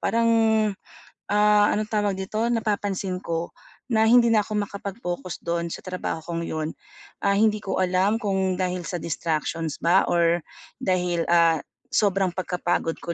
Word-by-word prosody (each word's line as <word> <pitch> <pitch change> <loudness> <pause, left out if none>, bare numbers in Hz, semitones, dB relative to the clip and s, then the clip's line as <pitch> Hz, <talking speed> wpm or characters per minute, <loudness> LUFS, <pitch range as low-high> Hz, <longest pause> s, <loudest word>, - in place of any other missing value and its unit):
parang, 230 0 +1 1.0
ah, 210 0 +4
anong 215 0 0
tawag 205 -3 0
dito, 215 +4 -2
napapansin 205 -5 -1
ko 165 -1 -3 0.4
na 220 0 +4
hindi 235 -1 +6
na 215 - +5
ako 210 +1 -4
makapag-focus 195 -4 -6
doon 170 0 -1
sa - - -7
trabaho 185 -3 -3
kong 170 0 -4
yun. 155 0 -3 0.5
Ah, 200 0 +2
hindi 215 0 +3
ko 195 - -3
alam 185 +4 +2
kung 190 -3 0
dahil 180 -1 -2
sa 180 - -4
distractions 160 -1 -2
ba 175 +3 +4
or 170 0 +3 0.4
dahil, 180 -5 0
ah, 165 -2 +4 0.3
sobrang 195 -3 +2
pagkapagod 175 -2 -1
ko 170 - -3
185 Hz, 145 wpm, -24 LUFS, 170-210 Hz, 1.0 s, hindi